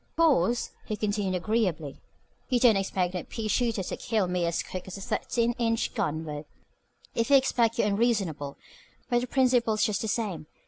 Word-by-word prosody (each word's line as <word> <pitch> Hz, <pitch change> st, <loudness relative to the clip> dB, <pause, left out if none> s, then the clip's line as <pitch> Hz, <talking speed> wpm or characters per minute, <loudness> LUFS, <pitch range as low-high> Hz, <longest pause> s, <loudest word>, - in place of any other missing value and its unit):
"Of -, -, -41 dB
course," 245 Hz, -, +3 dB, 0.2 s
he 215 Hz, -, -2 dB
continued 205 Hz, -2 st, -1 dB
agreeably, 180 Hz, -7 st, -1 dB, 0.5 s
"you 250 Hz, -2 st, +3 dB
don't 235 Hz, -3 st, +6 dB
expect 190 Hz, -2 st, 0 dB
no 180 Hz, -, -2 dB
pea 225 Hz, -2 st, -5 dB
shooter 230 Hz, -3 st, +1 dB
to -, -, -4 dB
kill 215 Hz, -5 st, 0 dB
me 180 Hz, -1 st, 0 dB
as 170 Hz, -, -1 dB
quick 185 Hz, 0 st, -7 dB
as 190 Hz, -, -6 dB
a -, -, -8 dB
thirteen 235 Hz, +4 st, 0 dB
inch 230 Hz, -1 st, 0 dB
gun 155 Hz, +2 st, -1 dB
would. 150 Hz, -1 st, -6 dB, 0.7 s
If 230 Hz, +3 st, 0 dB
you 280 Hz, -, +7 dB
expect 240 Hz, -4 st, +2 dB
that -, -, +3 dB
you're 205 Hz, -, +2 dB
unreasonable. 195 Hz, -11 st, 0 dB, 0.5 s
But 240 Hz, 0 st, +3 dB
the 250 Hz, -, -3 dB
principle 245 Hz, -4 st, +3 dB
is 215 Hz, -, +1 dB
just 210 Hz, -2 st, +1 dB
the 220 Hz, -, -2 dB
same. 200 Hz, -8 st, -2 dB
215 Hz, 195 wpm, -28 LUFS, 180-235 Hz, 0.7 s, you